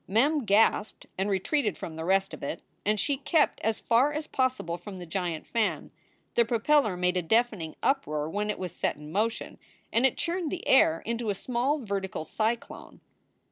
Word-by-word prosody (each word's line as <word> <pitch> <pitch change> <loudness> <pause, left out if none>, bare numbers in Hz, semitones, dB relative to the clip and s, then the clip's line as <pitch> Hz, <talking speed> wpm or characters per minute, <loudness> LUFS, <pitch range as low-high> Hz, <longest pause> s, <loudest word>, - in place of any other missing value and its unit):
Mem 275 +7 +2
gasped 210 0 +2
and 190 +2 -1
retreated 210 - 0
from 165 - -6
the 160 0 -5
rest 195 +1 +1
of 155 - -8
it, 150 +4 -4 0.2
and 210 +1 +1
she 275 +8 +1
kept 300 +2 +2
as 220 -1 0
far 250 +5 +3
as 300 +1 -3
possible 255 - -1
from 190 +3 -9
the 180 - -7
giant 175 -2 -3
fan. 230 -2 -1 0.4
The 235 - +5
propeller 230 -2 +2
made 180 0 +1
a - - +2
deafening 210 -3 +1
uproar 155 - 0
when 205 +5 -2
it 210 - -1
was 180 -2 -4
set - - 0
in 150 +1 -11
motion, 220 +5 -1 0.3
and 230 - +3
it 265 - +3
churned 345 -2 -1
the 360 - -5
air 165 -11 +5
into 235 -1 -2
a 200 - 0
small 255 +7 -1
vertical 195 -4 -3
cyclone. 225 +7 -3
215 Hz, 185 wpm, -28 LUFS, 180-255 Hz, 0.4 s, The